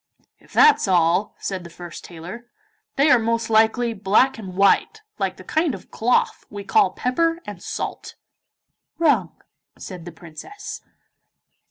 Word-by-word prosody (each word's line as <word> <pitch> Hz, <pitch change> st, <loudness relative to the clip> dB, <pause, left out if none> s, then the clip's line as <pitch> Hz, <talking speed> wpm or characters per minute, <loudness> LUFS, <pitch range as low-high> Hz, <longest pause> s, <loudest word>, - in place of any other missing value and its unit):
'If -, -, -23 dB
that's 445 Hz, -, +5 dB
all,' 180 Hz, +2 st, +2 dB
said 190 Hz, -2 st, -4 dB
the 170 Hz, -, -10 dB
first 170 Hz, 0 st, -10 dB
tailor, 180 Hz, +8 st, -9 dB, 0.5 s
'they 285 Hz, +2 st, +4 dB
are 250 Hz, -, +6 dB
most 230 Hz, 0 st, -1 dB
likely 225 Hz, +2 st, +3 dB
black 220 Hz, +5 st, +2 dB
and 190 Hz, -4 st, -8 dB
white, 200 Hz, -, +2 dB, 0.2 s
like -, -, -2 dB
the -, -, -11 dB
kind 315 Hz, -2 st, 0 dB
of -, -, -14 dB
cloth 245 Hz, +3 st, +1 dB
we 205 Hz, -1 st, -7 dB
call 190 Hz, -1 st, +3 dB
pepper 330 Hz, +7 st, 0 dB
and 200 Hz, -4 st, -8 dB
salt.' -, -, -5 dB, 0.8 s
'Wrong,' 275 Hz, -, +1 dB, 0.4 s
said 180 Hz, -4 st, -9 dB
the 175 Hz, -, -7 dB
Princess. 170 Hz, -, -9 dB
215 Hz, 145 wpm, -22 LUFS, 180-250 Hz, 0.8 s, are